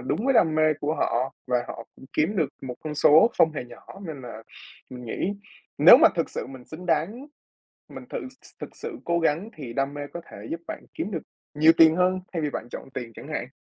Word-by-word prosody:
đúng 135 - -2
với 270 0 +3
đam 160 -8 +4
mê 155 0 +4
của 150 +2 -1
họ 130 -1 -1
và 125 -1 0
họ 115 - -7
cũng - - -14
kiếm 175 +8 +1
được 160 -6 +2
một 130 -2 -5
con 155 -1 -4
số 155 +8 +6
không 160 - +5
hề 145 -5 -5
nhỏ, 120 - -15 0.2
nên 150 -5 -7
là 115 -2 -9 0.5
mình 125 -1 -8
nghĩ 175 - -2 0.5
nếu - - +10
mà - - +8
thực - - -1
sự - - -5
mình 130 -1 -11
xứng 170 +6 -10
đáng, 175 - -1 0.6
mình - - -10
tự - - -3
th 260 0 -13
thực - - -8
sự 455 -7 -6
cố 170 0 +1
gắng 165 +6 0
thì 135 -6 -7
đam 135 +3 -1
mê 145 - -5
có 170 - -4
thể - - -10
giúp 165 - -3
bạn - - -7
kiếm 195 - -3
được 165 -7 -3 0.3
nhiều 155 +2 +6
tiền 160 0 +7
hơn 185 +1 +2
thay 165 -3 -2
vì 150 - -1
bạn 120 - -5
chọn - - -8
tiền 120 -2 -5
chẳng - - -10
hạn. - - -4
155 Hz, 240 wpm, -25 LUFS, 130-170 Hz, 0.6 s, nếu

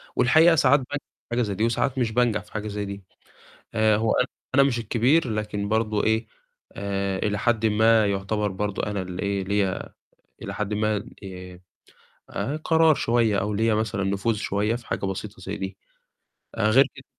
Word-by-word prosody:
والحقيقة 160 +6 +5
ساعات 140 -1 +5
بانجح 140 +2 -6 0.2
في - - -79
حاجة 120 +1 +1
زي 105 -4 -1
دي 110 - -1
وساعات 125 +3 0
مش 120 -3 +1
بانجح 110 -3 +1
في - - -22
حاجة 110 -1 -4
زي 105 0 -3
دي. 100 0 -7 0.7
آآ 110 -1 +3
هو 110 +1 +1 0.4
أنا 140 - +6
مش 135 -3 +2
الكبير، 120 +6 +2
لكن 105 -1 -3
برضه 110 -1 +1
إيه، 110 +1 +1 0.5
آآ 100 -1 -2
إلى 105 +1 -1
حدٍ 115 0 +1
ما 110 0 +4
يعتبر 100 +1 -1
برضه 100 +1 -3
أنا 105 -2 -2
اللي 90 0 -6
إيه، 100 -1 -1
ليّا 100 -1 -1 0.5
إلى - - -5
حدٍ 105 0 -3
ما 105 -1 0 1.2
آآ، 145 +3 -3
قرار 160 -1 +4
شوية 115 -4 +2
أو 105 +2 -1
ليّا 110 +2 +2
مثلًا 110 -2 -1
نفوذ 100 +3 0
شوية 105 +2 -1
في 120 0 -9
حاجة - - -2
بسيطة 95 +1 -5
زي 100 +3 -5
دي، 95 0 -5 0.8
آآ، - - +1
غير - - +6
كده - - -13
105 Hz, 180 wpm, -25 LUFS, 100-115 Hz, 1.2 s, أنا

